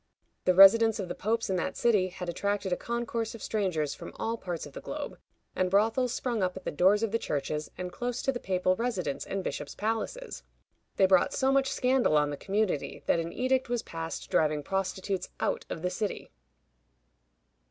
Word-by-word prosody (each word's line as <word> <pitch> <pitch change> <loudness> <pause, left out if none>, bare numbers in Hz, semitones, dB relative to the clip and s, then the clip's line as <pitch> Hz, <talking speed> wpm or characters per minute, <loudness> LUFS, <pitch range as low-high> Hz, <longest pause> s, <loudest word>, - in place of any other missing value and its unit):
The 185 - +4
residence 220 +4 +8
of 190 -3 -4
the - - -2
popes 225 +5 -1
in 190 - 0
that 175 - -2
city 210 -6 +3
had 180 -1 -7
attracted 200 +2 -1
a - - +3
concourse 235 0 -3
of 225 - -10
strangers 175 -9 -1
from - - -10
all 225 +1 -2
parts 175 -7 -5
of 145 - -12
the - - -7
globe, - - -6 0.4
and 185 0 +1
brothels 225 +6 +2
sprung 240 -3 -1
up 185 0 0
at 190 - -9
the - - -1
doors 190 +8 +4
of 225 - 0
the 230 - +1
churches, 150 -1 -2
and 180 0 -4
close 245 +3 -3
to 270 - +2
the 245 - -4
papal 185 -2 +1
residence 210 - -2
and 195 -1 -3
bishops' - - -4
palaces. 225 - -3 0.5
They 190 - +5
brought 185 -1 +4
so 265 -1 +2
much 270 0 +2
scandal 250 - +3
on 150 0 +2
the - - -3
community 195 -1 -1
that - - +3
an 165 0 -3
edict 255 0 0
was 240 -1 -1
passed 165 0 -6
driving 150 -1 +2
prostitutes 195 +1 -2
out - - -1
of 160 - -5
the 180 - 0
city. 205 +2 -3
195 Hz, 195 wpm, -29 LUFS, 180-230 Hz, 0.5 s, residence